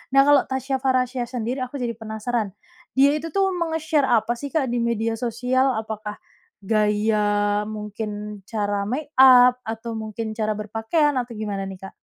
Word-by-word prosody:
Nah, 275 - +8
kalau 290 -1 +6
Tasya 265 0 -2
Farahsya 255 -1 +1
sendiri 245 +1 -3
aku 255 +2 -7
jadi 240 -2 -1
penasaran, 220 0 -3 0.4
dia 275 +2 +5
itu 305 +2 -4
tuh 390 -1 +3
menge-share 320 -3 0
apa 230 -2 +2
sih 285 - -4
Kak 305 -5 +1
di 245 - 0
media 230 -1 0
sosial? 250 +3 +1
Apakah 215 -1 -6 0.5
gaya 210 0 +1
mungkin 210 -1 -6
cara 205 -2 -1
make 285 +6 -3
up, 250 -1 +8
atau 225 +1 -4
mungkin 220 0 -4
cara 215 -1 -1
berpakaian, 225 +8 0
atau 240 -1 -5
gimana 205 -2 -3
nih 190 -1 -8
Kak? - - -14
230 Hz, 160 wpm, -23 LUFS, 215-260 Hz, 0.5 s, Nah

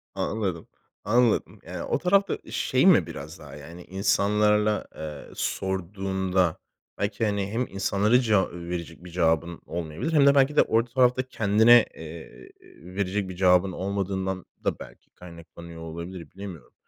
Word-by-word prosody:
Anladım. 95 -6 -2 0.4
Anladım. 115 +2 +2
Yani, - - -6
o - - 0
tarafta, 195 +1 +2
eee, - - -13
şey - - +1
mi - - +6
biraz - - -8
daha, - - -11
yani, 85 +4 -11
insanlarla, 105 +2 +1
eee, 75 -2 -8
sorduğunda 95 -2 -1 0.4
belki, 100 +2 -1
hani, 100 -2 -1
hem 120 +3 -1
insanlara 100 +4 +2
ceva 105 -6 +2
verecek 85 -1 -6
bir 90 - -10
cevabın 85 0 0
olmayabilir 85 - -4
hem 145 -2 +5
de 140 - +6
belki 140 +2 +3
de - - +7
o 115 +1 +2
tarafta 125 +1 +2
kendine, 110 +2 +5
eee, 80 0 -11 0.4
verecek 100 0 -1
bir 90 - -7
cevabın 90 0 +4
olmadığından 95 -1 -3 0.2
da - - -1
belki - - -13
kaynaklanıyor 85 -1 -12
olabilir, 85 +2 -8
bilemiyorum. 95 -4 -10
95 Hz, 140 wpm, -26 LUFS, 85-105 Hz, 0.4 s, de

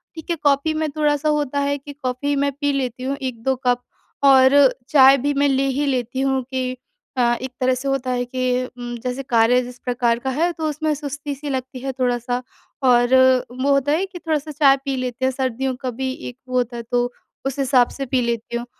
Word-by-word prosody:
ठीक 320 0 -10
है, 340 - +1
कॉफी 285 +2 +2
में 310 0 -1
थोड़ा-सा 300 0 +1
होता 290 -2 0
है, 285 0 0
कि 285 +1 -10
कॉफी 255 +3 -1
मैं 280 0 +1
पी 285 0 +2
लेती 255 -2 -3
हूँ 275 +2 -2
1-2 260 0 -1
कप 245 0 +2 0.4
और 265 -1 +7 0.4
चाय 270 -1 +7
भी 285 +2 0
मैं 285 0 +2
ले 270 0 +2
ही 290 - +1
लेती 260 -1 -1
हूँ 270 -1 +1
कि 255 -1 -2 0.4
अ, - - +3 0.2
एक 260 0 -5
तरह 255 0 +3
से 260 +2 -5
होता 270 -2 -1
है 245 0 0
कि 255 0 -1 0.2
म 240 0 -5
जैसे 250 +2 -3
कार्य 245 0 +3
जिस 245 0 -10
प्रकार 240 -2 +1
का 265 - -3
है 320 +7 +1
तो 320 -2 -3
उसमें 305 +1 -1
सुस्ती 285 0 -5
सी 290 +2 -7
लगती 260 -1 -4
है 270 +1 -3
थोड़ा-सा 245 0 0 0.4
और 245 -1 +4 0.4
वो 255 +3 0
होता 275 +1 +2
है 335 +6 +1
कि 375 -2 -10
थोड़ा-सा 310 -2 -2
चाय 280 -2 +5
पी 275 -1 -1
लेते 255 0 -3
हैं, 260 - +2
सर्दियों 260 0 -2
का 255 0 -4
भी 260 +2 -3 0.2
एक 245 - -13
वो 255 - 0
होता 245 -1 -1
है 235 - -5
तो 245 0 +1 0.3
उस 270 +1 -3
हिसाब 255 -2 +4
से 275 - -3
पी 260 0 0
लेती 235 0 -2
हूँ। 240 - -5
265 Hz, 220 wpm, -21 LUFS, 250-285 Hz, 0.4 s, और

